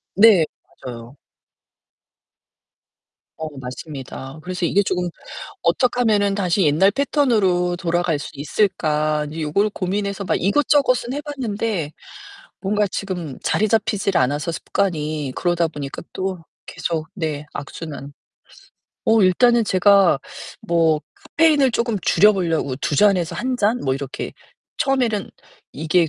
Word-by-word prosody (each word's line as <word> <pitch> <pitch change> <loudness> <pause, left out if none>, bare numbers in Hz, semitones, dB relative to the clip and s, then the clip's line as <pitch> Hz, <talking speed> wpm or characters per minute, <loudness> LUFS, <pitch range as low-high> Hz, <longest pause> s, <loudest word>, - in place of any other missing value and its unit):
네 200 -6 +7 0.4
맞아요. 120 +1 -8 2.2
어 160 - -3
맞습니다. 135 +2 -8
그래서 180 0 -3
이게 200 +4 +3
조금 180 -2 -1 0.5
'어떡하면은 210 +1 +2
다시 190 -1 +1
옛날 160 +7 +4
패턴으로 205 -10 +1
돌아갈 175 -3 0
수 - - -7
있을까?' 155 -2 0
인제 155 +2 -6
요걸 200 +8 +1
고민해서 200 +1 -3
막 - - 0
이것저것은 255 +3 +2
해 295 - -4
봤는데 220 - -3 0.7
뭔가 205 +1 +1
지금 175 -7 -5
자리 215 - +1
잡히질 205 -3 +1
않아서 145 +5 0
습관이 155 -7 -2
그러다 175 -2 +1
보니까 145 -3 -7
또 190 -1 -3 0.3
계속 160 -2 -3
네 155 -5 -3
악순환. 145 -1 -7 0.9
어 225 -2 +4
일단은 235 +5 +4
제가 195 -4 +4 0.4
뭐 165 -2 +2 0.4
카페인을 300 -5 +5
쪼금 235 -3 -1
줄여 210 +5 +5
보려고 165 -8 -1
2 145 0 -2
잔에서 185 -5 +3
1 255 0 -1
잔 220 +4 +2
뭐 130 - +1
이렇게 135 0 -5 0.5
처음에는 245 -7 0 0.4
이게 160 +3 +1
180 Hz, 260 characters per minute, -21 LUFS, 155-210 Hz, 2.2 s, 네